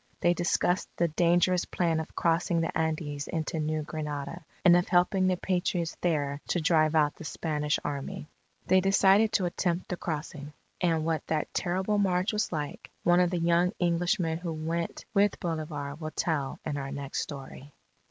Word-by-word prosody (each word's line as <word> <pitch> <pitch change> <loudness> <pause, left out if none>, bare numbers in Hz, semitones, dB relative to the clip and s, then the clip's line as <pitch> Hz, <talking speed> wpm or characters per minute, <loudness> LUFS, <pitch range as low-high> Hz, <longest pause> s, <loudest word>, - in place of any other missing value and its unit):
They 175 - +4
discussed 175 +1 +1
the 170 0 +2
dangerous 175 +2 +3
plan 165 -3 0
of 160 - -7
crossing 170 0 +1
the 165 - -2
Andes 155 -2 -2
into 160 0 -2
New 155 0 -1
Granada, 150 +2 -5 0.2
and 175 -1 +8
of 175 0 +2
helping 185 +1 +3
the 185 -1 +2
Patriots 175 -2 -1
there 145 -4 0
to 175 - +1
drive 155 -1 +3
out 150 -2 +3
the - - -9
Spanish 150 -2 -1
Army. 145 0 -4 0.4
They 185 0 +4
decided 195 +3 +4
to 190 - +2
attempt 175 0 -1
the 180 - -2
crossing. 150 -3 -5 0.3
And 165 -3 +1
what 160 -1 -1
that 155 -1 -1
terrible 190 +3 0
march 185 0 +1
was 210 - 0
like, 150 -3 -5
one 175 0 +5
of 180 -1 +4
the 180 - -1
young 170 +2 +2
Englishmen 170 -1 +1
who 170 -2 -4
went 165 +2 -3
with 200 0 +3
Bolivar, 155 -4 -3
will 155 -1 -4
tell 150 -4 -1
in 150 -2 -2
our 135 -1 -4
next 140 -1 -4
story. 140 0 -8
165 Hz, 170 wpm, -28 LUFS, 155-180 Hz, 0.4 s, and